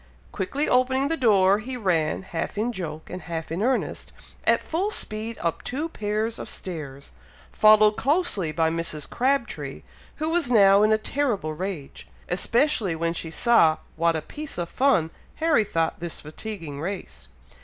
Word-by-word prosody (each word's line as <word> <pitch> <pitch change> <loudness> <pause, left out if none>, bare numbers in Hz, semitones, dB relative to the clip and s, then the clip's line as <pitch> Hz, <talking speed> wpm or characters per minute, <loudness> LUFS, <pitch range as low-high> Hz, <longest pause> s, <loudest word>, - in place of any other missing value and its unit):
Quickly 275 +10 -1
opening 260 +2 +2
the 325 - +1
door, 205 -7 +4
he 250 +4 -6
ran, 180 -6 0
half 170 +1 -4
in 225 +4 0
joke 160 -7 -6
and 180 +1 -6
half 165 -2 -5
in 170 +4 -2
earnest, 255 +3 -1 0.3
at - - +4
full 365 +6 -2
speed 225 - -2
up 170 -1 -2
two 295 +6 -3
pairs 215 -2 -2
of - - -6
stairs, 145 -6 -7 0.4
followed 215 0 +6
closely 275 - +1
by 160 +1 +1
Mrs. 165 -3 -2
Crabtree, 265 0 -1 0.3
who 310 0 -2
was 330 -5 +1
now 200 -4 +6
in 215 +1 +4
a 220 - +5
terrible 215 - -1
rage, 175 -4 -6 0.2
especially 225 - +1
when 165 +1 -1
she 165 -1 -4
saw 165 -4 +4 0.2
what 165 0 +2
a 155 - -3
piece 300 - -8
of 170 -1 -3
fun 220 - +2 0.2
Harry 315 -8 +3
thought 165 -5 -1
this 170 -1 -5
fatiguing 155 -2 -7
race. 190 +3 -6
205 Hz, 160 wpm, -25 LUFS, 165-250 Hz, 0.4 s, followed